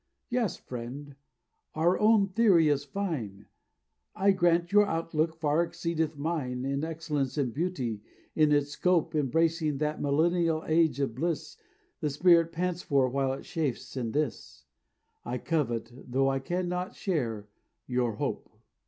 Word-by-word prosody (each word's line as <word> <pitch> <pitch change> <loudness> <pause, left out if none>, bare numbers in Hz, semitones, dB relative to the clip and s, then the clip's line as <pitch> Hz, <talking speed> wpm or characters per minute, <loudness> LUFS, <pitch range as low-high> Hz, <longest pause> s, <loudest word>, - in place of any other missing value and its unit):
"Yes, 240 -6 0
friend, 130 +4 -8 0.6
I 160 +1 0
own 210 +5 +5
your 195 - -2
theory 185 -7 +5
is 145 -1 +1
fine; 140 - -4 0.7
I 200 +1 +4
grant 175 -1 +2
your 205 0 +5
outlook 165 -1 -1
far 155 0 +1
exceedeth 165 -2 -2
mine 140 -5 -2
In 140 +2 -1
excellence 155 -4 -2
and 130 -5 0
beauty, 130 - -2 0.3
in 155 -1 +4
its 145 -1 +2
scope 175 0 +1
Embracing 155 +1 +1
that 150 +1 -2
millennial 160 +2 +2
age 160 -3 +2
of 135 -5 0
bliss 160 +5 -3 0.4
The 150 - -1
spirit 165 +3 +4
pants 175 +1 -2
for 140 -5 +2
while 135 +1 0
it 135 - -7
chafes 150 -7 -3
in 120 -4 -2
this; 145 - -3 0.6
I 125 +1 -3
covet, 120 -7 -1
tho 135 +1 0
I 135 0 0
cannot 180 +4 -3
share, 115 - -2 0.4
your 125 -2 0
hope." - - -3
155 Hz, 145 wpm, -29 LUFS, 135-170 Hz, 0.7 s, own